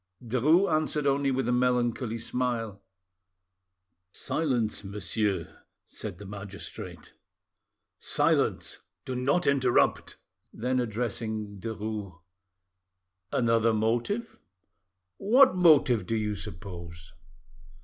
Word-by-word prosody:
Derues 145 - +3
answered 155 -1 0
only 140 0 +2
with 130 -2 0
a - - +2
melancholy 125 -1 +1
smile. 115 -3 -2 1.3
"Silence, 120 -6 -1
monsieur," 100 -2 -2 0.3
said 85 - -7
the 100 - -10
magistrate, 100 0 -9 0.9
"silence; - - +1 0.3
do 130 - -4
not 140 +8 +1
interrupt." 130 -3 +2 0.3
Then 125 +3 -1
addressing 110 -3 -3
Derues— 105 -4 -5 1.1
"Another 115 -1 +2
motive? 120 - -1 0.8
What 255 +5 +5
motive 145 - +5
do 115 - 0
you 105 -1 -1
suppose?" 85 -3 -9
115 Hz, 85 wpm, -28 LUFS, 105-130 Hz, 1.3 s, What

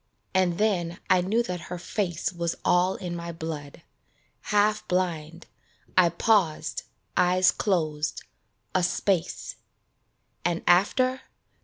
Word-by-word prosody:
And 185 -2 +2
then 180 -5 0
I 185 -1 +5
knew 215 +6 +1
that 180 -6 -5
her 180 - -4
face 175 -1 -2
Was 170 -1 -2
all 180 +2 +3
in 175 -3 -5
my 170 0 -5
blood; 160 -2 -7 0.6
half 210 0 +1
blind, 170 -2 -2 0.5
I 180 -2 +6
paused, 170 -4 +1 0.3
eyes 180 0 +4
closed, 155 -6 -1 0.5
a 185 - +3
space 180 0 -1 0.9
And 170 0 -1
after 255 +8 +3
180 Hz, 115 wpm, -26 LUFS, 170-190 Hz, 0.9 s, I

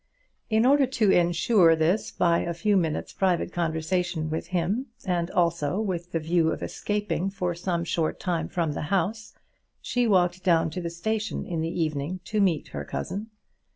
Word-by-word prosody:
In 220 +1 +3
order 275 0 +5
to 225 -6 +2
insure 175 0 +4
this 165 +6 +1
by 170 -1 +2
a 170 0 -3
few 210 +4 +1
minutes' 165 -5 -1
private 180 -2 0
conversation 165 0 -1
with 160 - -3
him, 185 +9 -1 0.2
and 175 -2 0
also 170 0 +1
with 180 -5 -3
the - - 0
view 160 0 +2
of - - -4
escaping 205 -3 -2
for 180 -3 -2
some 170 0 -2
short 165 -1 -1
time 175 -4 -1
from 170 -4 -1
the - - -4
house, 205 +4 -1 0.4
she 245 -1 0
walked 180 -3 +2
down 165 -3 +3
to 180 - -4
the 170 - -3
station 215 +6 -3
in 165 -2 -3
the 165 - -1
evening 155 +3 -3
to 215 +2 -1
meet 175 -6 +1
her 70 0 -5
cousin. 195 - -4
175 Hz, 175 wpm, -26 LUFS, 165-195 Hz, 0.4 s, order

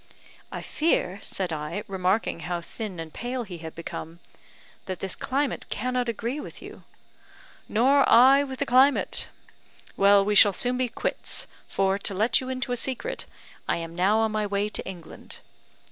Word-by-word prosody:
"I - - -6
fear," 205 - 0
said 185 -4 -2
I, 150 +7 -4
remarking 190 0 0
how 175 +1 -3
thin 190 +1 -7
and 160 -1 -7
pale 245 +2 -3
he 180 -6 -9
had 160 -1 -8
become, 165 0 -7 0.7
"that 185 -2 -4
this 190 -1 -3
climate 275 0 -2
cannot 250 +1 -1
agree 235 +5 -3
with - - -9
you." - - -11 0.9
"Nor 270 +5 +4
I 265 +4 +7
with 265 -2 -6
the 285 - -1
climate. 265 +2 +3 0.7
Well, 200 0 +5
we 210 - +1
shall 205 0 +7
soon 245 +6 0
be 255 -1 0
quits, - - -1 0.2
for, 195 0 +1
to 200 - -3
let 220 +7 +2
you 260 - -6
into 255 -1 -3
a 245 - 0
secret, 270 - -3 0.4
I - - +2
am 165 0 -6
now 190 +5 +3
on 220 0 +2
my 215 -1 -1
way 200 +1 -1
to - - -3
England." 175 -4 -9
210 Hz, 170 wpm, -26 LUFS, 185-255 Hz, 0.9 s, I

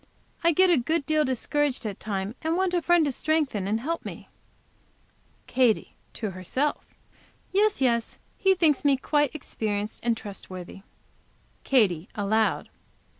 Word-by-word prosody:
I 335 - +5
get 370 +3 +4
a 340 - +5
good 315 +5 0
deal 310 0 +2
discouraged 270 0 -1
at 205 -3 -4
times, 200 -1 -3
and 325 +2 0
want 375 -1 +1
a 350 - +2
friend 345 -1 +4
to 285 - 0
strengthen 280 -9 0
and 215 +2 0
help 330 +7 -3
me." - - -8 1.2
Katy, 250 -4 +2 0.2
to 215 -4 -4
herself. 225 +11 -2 0.7
"Yes, 415 -2 +2
yes, 235 -3 +1 0.2
he 385 -1 +3
thinks 315 -6 +2
me 280 -2 +4
quite 295 +1 +1
experienced 210 -7 -3
and 235 -1 +1
trustworthy." 190 -3 -8 0.8
Katy, 200 - +2
aloud. 215 +2 +1
260 Hz, 140 wpm, -26 LUFS, 215-315 Hz, 1.2 s, I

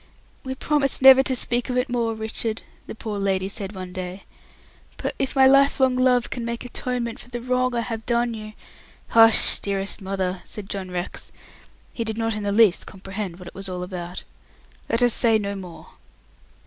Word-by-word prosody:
"We 260 0 -4
promised 275 -1 +1
never 265 0 +10
to 265 -1 0
speak 240 0 +1
of 250 - -1
it 250 +2 +1
more, 235 -3 -1
Richard," 220 0 -3 0.2
the - - -7
poor 215 -2 -5
lady 190 -1 0
said 200 0 -3
one 185 -1 -7
day, 185 +1 -6 0.7
"but - - -3
if 270 +1 -2
my 265 -1 +6
lifelong 270 -1 +4
love 255 -1 +2
can 240 - -3
make 235 +1 -4
atonement 245 -1 -3
for - - -13
the 240 -1 -5
wrong 250 0 0
I 235 - +1
have 225 -1 -5
done 235 0 +1
you 215 -1 -8 0.3
" - - -28
"Hush, 225 -1 +6
dearest 200 0 -2
mother," 190 -1 -3
said 205 -2 -6
John 190 -2 -4
Rex, 180 0 -3 0.6
who 230 - -2
did 220 -1 -4
not 225 0 -1
in 215 - -4
the 205 0 -1
least 205 -3 +4
comprehend 190 -2 -6
what 180 -1 -11
it - - -10
was 195 0 -7
all 180 -1 -4
about. 180 -1 -6 0.7
"Let 230 +2 +2
us 245 -2 +4
say 225 -2 +4
no 200 -1 -3
more." 185 -4 -10
225 Hz, 195 wpm, -23 LUFS, 195-245 Hz, 0.7 s, never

